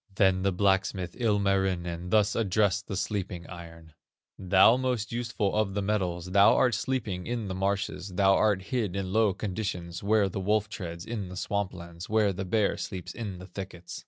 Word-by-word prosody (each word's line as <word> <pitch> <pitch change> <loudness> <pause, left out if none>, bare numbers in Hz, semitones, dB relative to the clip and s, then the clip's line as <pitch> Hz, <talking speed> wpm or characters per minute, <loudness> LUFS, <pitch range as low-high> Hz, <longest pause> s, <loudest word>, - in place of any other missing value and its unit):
"Then 95 -2 +3
the 100 +1 +2
blacksmith, 95 -1 0
Ilmarinen, 95 -6 0
Thus 105 +1 +3
addressed 100 -2 +1
the 100 - -3
sleeping 95 -4 -3
iron: 80 -3 -11 0.5
'Thou 95 +5 +5
most 125 -4 -1
useful 115 -4 -1
of 105 -2 0
the 100 - 0
metals, 90 -4 -1
Thou 100 +1 +6
art 125 -2 +3
sleeping 110 -6 -2
in 120 -3 -2
the - - -2
marshes, 95 0 -2
Thou 95 +1 +5
art 100 -2 +2
hid 110 -6 -2
in 95 -1 -3
low 110 -3 +3
conditions, 90 -4 -4
Where 105 0 +3
the 95 - -4
wolf 105 +2 +1
treads 85 -5 -6
in 105 -5 -4
the 90 - -8
swamp 100 0 -1
lands, 85 -1 -9
Where 105 -2 +3
the 95 +1 -4
bear 100 +2 +1
sleeps 90 -2 -6
in 105 -6 -5
the 90 - -10
thickets. 90 -2 -8
100 Hz, 180 wpm, -28 LUFS, 90-105 Hz, 0.5 s, Thou